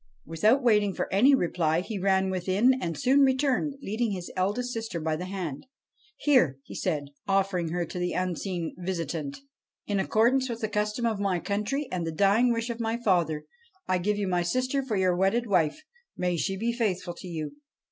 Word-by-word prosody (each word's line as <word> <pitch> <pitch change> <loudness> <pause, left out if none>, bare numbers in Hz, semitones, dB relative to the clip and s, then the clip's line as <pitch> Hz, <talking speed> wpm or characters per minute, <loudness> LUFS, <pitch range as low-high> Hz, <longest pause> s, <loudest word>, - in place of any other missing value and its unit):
Without 215 - +2
waiting 210 -5 +3
for - - -2
any 260 +8 +6
reply 170 -6 +1
he 205 +2 -5
ran 190 0 +2
within, 190 +7 +3
and 165 -3 -3
soon 260 - +3
returned, 275 +1 +2
leading 220 +1 -1
his 180 -2 -6
eldest 210 +7 -1
sister 225 -6 -4
by 160 0 -1
the 175 +3 -5
hand. 185 - -5 0.3
' 305 0 -34
Here,' 250 - +4 0.2
said 155 -6 -1
he, 140 0 -15
' - - -42
offering 190 -4 +1
her 175 +1 -1
to 180 - -6
the 180 0 -1
unseen 180 -1 -2
visitant, 165 -5 -3 0.3
' - - -67
in 205 -1 0
accord 220 +5 +3
ance 265 -1 +1
with 235 0 -4
the 220 - -1
custom 210 +3 -1
of 220 -3 0
my 195 -3 +1
country 210 - -2
and 175 -2 -2
the - - -1
dying 205 +8 +3
wish 230 +1 -1
of 235 - -6
my 225 0 -1
father, 175 -9 +1 0.4
I 185 -1 +1
give 205 +3 0
you 205 -1 -1
my 180 -1 +1
sister 255 +10 0
for 255 -5 -3
your 185 -2 +2
wedded 195 +6 +2
wife. 185 - +1 0.3
May 180 -1 0
she 195 +3 -1
be 230 +4 -1
faithful 195 -7 -1
to 185 - -9
you.' 165 - -5
195 Hz, 205 wpm, -27 LUFS, 175-235 Hz, 0.4 s, any